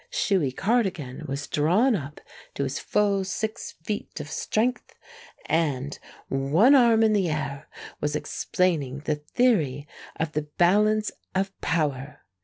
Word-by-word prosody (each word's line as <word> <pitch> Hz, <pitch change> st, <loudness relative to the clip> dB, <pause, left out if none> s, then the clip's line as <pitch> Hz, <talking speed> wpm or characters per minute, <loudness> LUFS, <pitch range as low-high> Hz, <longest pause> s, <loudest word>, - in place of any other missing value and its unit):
Shuey 190 Hz, -, +1 dB
Cardigan 175 Hz, -, -1 dB
was 140 Hz, +2 st, -3 dB
drawn 190 Hz, -, +2 dB
up 145 Hz, -4 st, -6 dB, 0.4 s
to 140 Hz, -, -1 dB
his 135 Hz, -1 st, -3 dB
full 200 Hz, -2 st, +1 dB
six 215 Hz, +4 st, -4 dB
feet 205 Hz, -2 st, -4 dB
of 150 Hz, 0 st, -7 dB
strength, 245 Hz, +4 st, -1 dB, 0.5 s
and, 145 Hz, -4 st, -1 dB, 0.3 s
one 150 Hz, -, +4 dB
arm 235 Hz, -4 st, +6 dB
in 220 Hz, -1 st, +4 dB
the 195 Hz, -5 st, +2 dB
air, 150 Hz, -2 st, -4 dB, 0.3 s
was 150 Hz, 0 st, -1 dB
explaining 150 Hz, -4 st, -1 dB
the 155 Hz, -, +1 dB
theory 150 Hz, -, +1 dB, 0.3 s
of 160 Hz, -1 st, -2 dB
the 150 Hz, -1 st, -3 dB
balance 210 Hz, +4 st, +3 dB, 0.2 s
of 195 Hz, +1 st, 0 dB
power. 145 Hz, -3 st, -2 dB
165 Hz, 130 wpm, -25 LUFS, 145-210 Hz, 0.5 s, arm